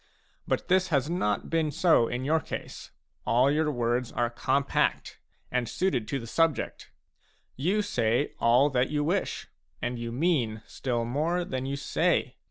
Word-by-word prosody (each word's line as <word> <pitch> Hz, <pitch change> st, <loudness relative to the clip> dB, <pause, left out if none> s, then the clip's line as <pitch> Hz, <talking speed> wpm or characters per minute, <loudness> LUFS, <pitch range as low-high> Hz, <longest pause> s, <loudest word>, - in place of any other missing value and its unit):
But -, -, -1 dB
this 185 Hz, 0 st, +3 dB
has 145 Hz, -1 st, 0 dB
not 105 Hz, -, -1 dB
been 165 Hz, -2 st, +1 dB
so 160 Hz, -5 st, +3 dB
in 125 Hz, +2 st, -3 dB
your 160 Hz, +3 st, +3 dB
case; -, -, -7 dB, 0.3 s
all 125 Hz, +4 st, +3 dB
your 155 Hz, +1 st, +1 dB
words 120 Hz, -2 st, -1 dB
are 120 Hz, -1 st, 0 dB
compact, 135 Hz, +3 st, 0 dB, 0.3 s
and 125 Hz, -2 st, 0 dB
suited 150 Hz, -, 0 dB
to 140 Hz, -, -1 dB
the 120 Hz, -, -7 dB
subject. 165 Hz, +5 st, 0 dB, 0.7 s
You 190 Hz, +10 st, +1 dB
say 125 Hz, -, 0 dB
all 125 Hz, +5 st, +4 dB
that 125 Hz, -1 st, +1 dB
you 150 Hz, -1 st, 0 dB
wish, 180 Hz, +6 st, -1 dB, 0.3 s
and 120 Hz, 0 st, -3 dB
you 115 Hz, 0 st, -4 dB
mean 120 Hz, -7 st, 0 dB
still 120 Hz, -3 st, -2 dB
more 160 Hz, +8 st, 0 dB
than 130 Hz, -2 st, -3 dB
you 140 Hz, -, -2 dB
say. 140 Hz, -, 0 dB
135 Hz, 160 wpm, -28 LUFS, 120-160 Hz, 0.7 s, all